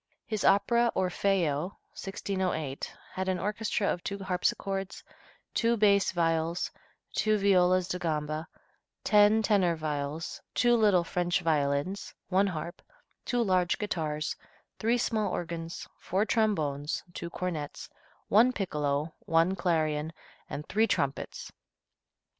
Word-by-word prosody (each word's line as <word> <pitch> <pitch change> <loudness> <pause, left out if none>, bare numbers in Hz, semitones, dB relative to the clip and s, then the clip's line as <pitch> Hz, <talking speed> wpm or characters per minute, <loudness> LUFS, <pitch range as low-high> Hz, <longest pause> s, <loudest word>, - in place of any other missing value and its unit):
His 215 -3 -2
opera, 235 +4 +4
"Orfeo," 180 -3 0 0.2
1608, 185 -7 -3 0.2
had 190 0 -2
an 185 - +1
orchestra 210 +2 -1
of 175 - -8
two 200 - -3
harpsichords, 195 +1 -2 0.5
two 235 0 +2
bass 200 -2 +4
viols, 165 -1 0 0.4
two 215 0 +2
violas 185 -2 +4
di 180 - -3
gamba, 155 -1 -2 0.6
ten 210 +1 +5
tenor 190 -6 +3
viols, 150 0 -4
two 240 -1 +4
little 205 -6 +4
French 175 +1 0
violins, 150 +3 0
one 195 +2 +3
harp, 170 0 -5 0.4
two 245 -1 +1
large 185 -4 +2
guitars, 155 -7 -2 0.4
three 230 +3 +2
small 220 -3 0
organs, 165 -1 -5
four 195 +4 0
trombones, 155 -11 0
two 170 - -5
cornets, 170 -5 -4 0.4
one 230 +5 +5
piccolo, 150 - -1
one 165 +3 +3
clarion 160 -4 0 0.4
and 150 - -6
three 220 +2 +2
trumpets. 140 -8 -2
180 Hz, 115 wpm, -29 LUFS, 160-200 Hz, 0.6 s, ten